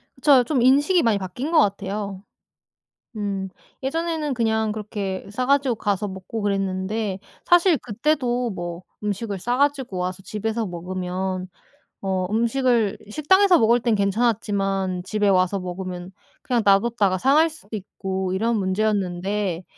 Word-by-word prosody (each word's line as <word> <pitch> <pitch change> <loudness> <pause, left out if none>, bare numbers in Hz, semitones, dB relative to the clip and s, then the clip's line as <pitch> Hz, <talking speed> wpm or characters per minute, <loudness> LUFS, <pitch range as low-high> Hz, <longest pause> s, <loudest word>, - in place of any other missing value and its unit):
그쵸. 275 -4 +5
좀 260 -1 0
인식이 290 +8 +4
많이 220 -3 +3
바뀐 200 - -5
것 320 - +5
같아요. 200 -2 -1 0.9
음. 200 -2 -3 0.3
예전에는 320 0 -1
그냥 220 -2 +1
그렇게 205 -3 -4
싸 250 +4 -2
가지고 275 -3 +2
가서 205 -1 -1
먹고 190 +3 -6
그랬는데 195 +1 -1 0.3
사실 350 -2 +5
그때도 245 +1 0
뭐 175 -1 -5 0.2
음식을 205 -1 -3
싸 240 +7 -1
가지고 280 -8 0
와서 180 +1 -3
집에서 220 +2 -2
먹으면 185 +1 -4 0.5
어 190 -1 -1
음식을 235 -1 +1
식당에서 360 - +4
먹을 235 +2 +4
땐 235 -2 +1
괜찮았지만 200 -3 0
집에 210 +2 0
와서 185 0 +3
먹으면 180 0 -6 0.3
그냥 240 -4 0
놔뒀다가 200 -1 +3
상할 295 - +4
수도 225 -9 -9
있고 190 -1 -4
이런 225 +4 +1
문제였는데 190 -2 -1
210 Hz, 300 characters per minute, -23 LUFS, 190-245 Hz, 0.9 s, 그쵸